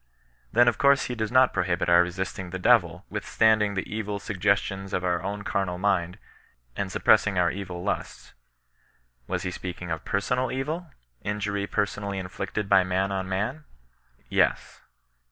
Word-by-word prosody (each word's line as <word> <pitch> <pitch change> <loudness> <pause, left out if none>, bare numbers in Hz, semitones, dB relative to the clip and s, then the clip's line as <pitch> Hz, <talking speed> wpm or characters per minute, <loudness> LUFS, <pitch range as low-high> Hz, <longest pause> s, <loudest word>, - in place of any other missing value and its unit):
Then 120 +2 +5
of 120 - +2
course 140 0 +5
he 125 - -3
does 110 -2 -3
not 130 0 +5
prohibit 90 -1 0
our 85 0 +6
resisting 90 +1 -3
the 95 - -4
i^vily - - +3
mtiistundiog 110 -2 +2
tlio 110 +1 -4
eril 105 0 -3
taggiBiio^jM 100 -1 -1
\i - - +1
oitt 90 -1 -1
own 100 +1 -4
carnal 100 -4 -1
mind, 90 -1 0 0.6
and 100 -2 -3
suppressing 100 -1 +3
our 85 -2 +3
evil 90 -3 -6
lusts. 100 - -4 0.9
Was - - -2
he 90 - -2
speaking 90 -1 -6
of 80 -1 -3
personal 125 +5 0
evil, 155 +6 -3 0.3
injury 105 -1 -2
personally 100 -1 -2
inflicted 95 +2 -4
by 95 - +5
man 95 +2 0
on 95 -1 -3
man? 115 +11 -2 0.6
Yes. - - 0
100 Hz, 155 wpm, -26 LUFS, 90-105 Hz, 0.9 s, our